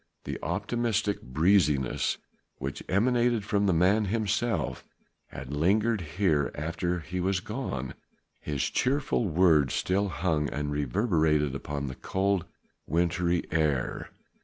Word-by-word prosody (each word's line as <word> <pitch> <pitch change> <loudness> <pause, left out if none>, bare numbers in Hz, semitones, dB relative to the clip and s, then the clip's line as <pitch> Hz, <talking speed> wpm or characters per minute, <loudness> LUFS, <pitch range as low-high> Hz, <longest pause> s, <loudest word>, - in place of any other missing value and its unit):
The - - -5
optimistic 110 -4 -1
breeziness 75 -1 +2 0.4
which 70 +1 -5
emanated 120 +2 +2
from 100 -1 +1
the - - +4
man 95 +6 +3
himself 110 +3 -1 0.4
had 65 +1 -8
lingered 105 +8 +2 0.2
here 80 -8 +2
after 85 +3 -2
he 90 +3 -5
was 95 +1 +1
gone. 90 - -4 0.5
His 75 -3 -2
cheerful 130 -4 +1
words 80 -5 +4
still 100 +2 +1
hung 80 -5 0
and 75 0 -3
reverberated 75 - +1
upon 70 +1 -4
the 65 - -4
cold, 95 +5 -1 0.4
wintry 85 +2 +1
air. 75 -5 0
90 Hz, 115 wpm, -28 LUFS, 75-105 Hz, 0.5 s, the